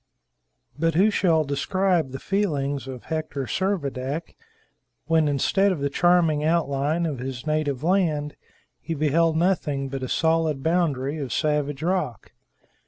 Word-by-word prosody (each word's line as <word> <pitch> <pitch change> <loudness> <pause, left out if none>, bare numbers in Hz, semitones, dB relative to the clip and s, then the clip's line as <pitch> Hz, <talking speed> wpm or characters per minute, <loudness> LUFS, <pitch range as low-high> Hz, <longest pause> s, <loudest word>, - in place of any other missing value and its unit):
But 165 0 +1
who 200 +5 +4
shall 165 -6 +2
describe 170 +3 0
the 135 - -6
feelings 145 - -1
of 130 -2 -7
Hector 155 -3 -3
Servadac 150 -5 -2 0.7
when, 160 -2 +3
instead 190 +8 +2
of 180 - -2
the 140 0 -1
charming 170 -3 +3
outline 155 0 +1
of 145 -6 -3
his 130 0 -5
native 155 -3 -1
land, 160 -5 +1 0.4
he 165 +1 -4
beheld 160 +2 +2
nothing 150 -6 0
but 135 0 -5
a 130 - -4
solid 160 -4 +1
boundary 155 -4 0
of 135 -4 -4
savage 150 -2 -1
rock? 165 - -2
155 Hz, 135 wpm, -24 LUFS, 140-170 Hz, 0.7 s, who